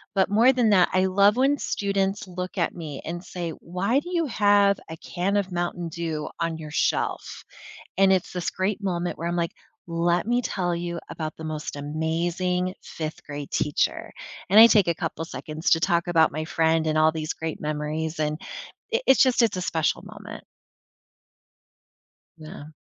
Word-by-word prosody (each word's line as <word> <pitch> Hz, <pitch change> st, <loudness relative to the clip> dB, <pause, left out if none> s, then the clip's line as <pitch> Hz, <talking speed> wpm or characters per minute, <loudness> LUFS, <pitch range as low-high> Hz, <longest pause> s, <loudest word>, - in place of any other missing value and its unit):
but 190 Hz, 0 st, +3 dB
more 225 Hz, +6 st, +5 dB
than 245 Hz, -3 st, +2 dB
that, 185 Hz, -3 st, +5 dB
I 185 Hz, 0 st, +3 dB
love 200 Hz, +4 st, +4 dB
when 275 Hz, +2 st, +3 dB
students 200 Hz, -3 st, -1 dB
look 180 Hz, 0 st, -6 dB
at -, -, 0 dB
me 155 Hz, -5 st, -7 dB
and 175 Hz, +2 st, -5 dB
say, 175 Hz, -2 st, -5 dB
"Why 195 Hz, +10 st, 0 dB
do 350 Hz, -, -9 dB
you 335 Hz, -2 st, +1 dB
have 205 Hz, -4 st, +4 dB
a 160 Hz, -, -7 dB
can 190 Hz, +5 st, -2 dB
of 195 Hz, -2 st, -1 dB
Mountain 175 Hz, 0 st, -2 dB
Dew 160 Hz, -2 st, -4 dB
on 165 Hz, -1 st, -1 dB
your 155 Hz, -2 st, -8 dB
shelf?" -, -, -1 dB, 0.6 s
And 195 Hz, 0 st, +5 dB
it's 185 Hz, -2 st, 0 dB
this 180 Hz, -2 st, -3 dB
great 195 Hz, +2 st, -2 dB
moment 175 Hz, -2 st, -2 dB
where 170 Hz, -, -3 dB
I'm 175 Hz, -, -2 dB
like, 170 Hz, -1 st, -1 dB, 0.3 s
"Let 170 Hz, +1 st, 0 dB
me 240 Hz, +1 st, +2 dB
tell 175 Hz, -6 st, -1 dB
you 170 Hz, 0 st, -4 dB
about 155 Hz, -1 st, -5 dB
the 160 Hz, -, -8 dB
most 155 Hz, -2 st, -5 dB
amazing 170 Hz, +5 st, -1 dB
fifth-grade 145 Hz, -2 st, -7 dB
teacher," 150 Hz, -, -1 dB, 0.4 s
and 205 Hz, -, +6 dB
I 230 Hz, -, +12 dB
take 205 Hz, -6 st, +4 dB
a 170 Hz, -, +2 dB
couple 165 Hz, 0 st, -4 dB
seconds 155 Hz, 0 st, -4 dB
to 165 Hz, -, +5 dB
talk 170 Hz, -1 st, +1 dB
about 160 Hz, -2 st, +4 dB
my 155 Hz, +2 st, -3 dB
friend 160 Hz, 0 st, +1 dB
and 155 Hz, 0 st, 0 dB
all 155 Hz, 0 st, +5 dB
these 155 Hz, -1 st, -3 dB
great 160 Hz, -1 st, -5 dB
memories 155 Hz, +1 st, -3 dB
and 150 Hz, 0 st, -1 dB, 0.5 s
it 470 Hz, +2 st, 0 dB
it's 265 Hz, -, +6 dB
just 255 Hz, -2 st, +3 dB
it's 225 Hz, -5 st, +2 dB
a 185 Hz, -, -2 dB
special 160 Hz, -3 st, 0 dB
moment. -, -, -10 dB, 1.9 s
Yeah. 155 Hz, -1 st, -10 dB
175 Hz, 180 wpm, -25 LUFS, 160-195 Hz, 1.9 s, I